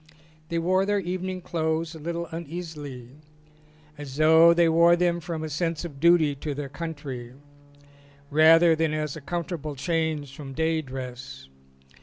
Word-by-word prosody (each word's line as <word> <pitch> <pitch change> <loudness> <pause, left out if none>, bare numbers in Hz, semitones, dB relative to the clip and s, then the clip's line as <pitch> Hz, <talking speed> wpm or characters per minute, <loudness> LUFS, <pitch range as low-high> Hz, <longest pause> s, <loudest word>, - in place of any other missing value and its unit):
They 170 - -1
wore 185 +3 +2
their 205 +1 +1
evening 185 0 -4
clothes 160 -1 -2
a 160 - -10
little 170 +2 -4
uneasily 155 -6 -7 0.9
as 140 -3 -8
though 160 +2 +6
they 170 0 +4
wore 170 +1 +5
them 175 0 +1
from 165 -1 -5
a - - -3
sense 165 +1 -2
of 145 -5 -9
duty 165 -2 +4
to 145 +1 -4
their 140 -1 -5
country 140 -5 -7 1.0
rather 165 +2 +6
than 160 -1 0
as 150 -2 -3
a 155 - -8
comfortable 155 -1 -4
change 155 -2 -2
from 140 -3 -8
day 160 0 +1
dress. 130 - -8
160 Hz, 150 wpm, -26 LUFS, 145-170 Hz, 1.0 s, though